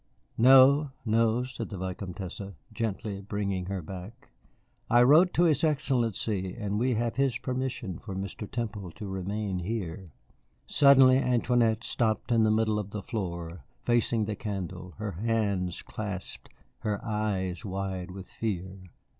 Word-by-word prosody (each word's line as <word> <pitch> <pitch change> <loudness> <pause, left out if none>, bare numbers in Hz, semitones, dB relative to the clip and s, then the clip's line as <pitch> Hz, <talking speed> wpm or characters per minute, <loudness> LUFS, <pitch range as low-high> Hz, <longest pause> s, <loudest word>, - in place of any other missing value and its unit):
"No, 135 +4 +7 0.2
no," 115 +2 +2
said 130 0 -6
the 100 - -6
Vicomtesse, 95 0 -5 0.3
gently 105 -2 -3
bringing 100 -2 -2
her 95 -2 -3
back. 95 +6 -9 0.6
"I 120 +1 +6
wrote 160 +8 +6
to 175 - +4
his 160 -2 +3
Excellency 115 - 0
and 105 -2 -2
we 125 +1 +2
have 115 +2 -1
his 135 -3 +2
permission 125 -8 -3
for 100 -4 -7
Mr. 100 +2 -5
Temple 110 -5 -4
to 105 - -7
remain 95 0 -3
here." 95 -2 -4 0.6
Suddenly 135 -2 +6
Antoinette 120 -2 +2
stopped 110 -1 0
in 115 -1 +4
the 110 - +4
middle 110 0 +2
of 105 -2 -5
the 100 -1 -6
floor, 85 - -5 0.2
facing 120 -2 +2
the 105 0 -3
candle, 95 -3 -5
her 105 -1 -3
hands 100 -2 -1
clasped, 100 -3 -6 0.3
her 105 -3 -2
eyes 105 -4 -1
wide 95 -2 -4
with 95 +1 -8
fear. 95 -3 -4
105 Hz, 140 wpm, -28 LUFS, 95-120 Hz, 0.6 s, No